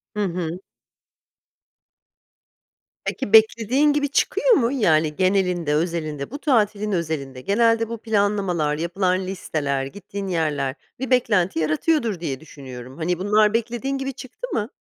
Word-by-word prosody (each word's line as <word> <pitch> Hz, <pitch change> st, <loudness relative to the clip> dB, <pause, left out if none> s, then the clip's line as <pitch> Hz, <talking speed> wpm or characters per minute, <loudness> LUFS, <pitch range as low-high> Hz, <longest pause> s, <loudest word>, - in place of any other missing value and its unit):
Hı -, -, -3 dB
hı. 175 Hz, -1 st, -3 dB, 2.5 s
Peki 245 Hz, -6 st, -3 dB
beklediğin 230 Hz, +6 st, +5 dB
gibi 285 Hz, -1 st, 0 dB
çıkıyor 460 Hz, -, +2 dB
mu? 240 Hz, -, +3 dB
Yani 155 Hz, -, +2 dB
genelinde, 180 Hz, -5 st, +1 dB
özelinde, 155 Hz, -, -2 dB
bu 285 Hz, -, -6 dB
tatilin 215 Hz, -7 st, +1 dB
özelinde, 155 Hz, -7 st, -3 dB
genelde 230 Hz, -, +2 dB
bu 230 Hz, -, -4 dB
planlamalar, 200 Hz, -8 st, 0 dB
yapılan 185 Hz, +3 st, 0 dB
listeler, 145 Hz, -7 st, -2 dB
gittiğin 200 Hz, +5 st, -7 dB
yerler 150 Hz, -6 st, -1 dB, 0.2 s
bir 265 Hz, -1 st, -3 dB
beklenti 205 Hz, -9 st, +2 dB
yaratıyordur 205 Hz, -, +1 dB
diye 140 Hz, -6 st, -3 dB
düşünüyorum. 130 Hz, -4 st, -10 dB
Hani 170 Hz, +1 st, -1 dB
bunlar 210 Hz, +2 st, +3 dB
beklediğin 240 Hz, +4 st, -1 dB
gibi 270 Hz, 0 st, -3 dB
çıktı 260 Hz, -, -8 dB
mı? 210 Hz, +1 st, -1 dB
195 Hz, 125 wpm, -23 LUFS, 160-230 Hz, 2.5 s, beklediğin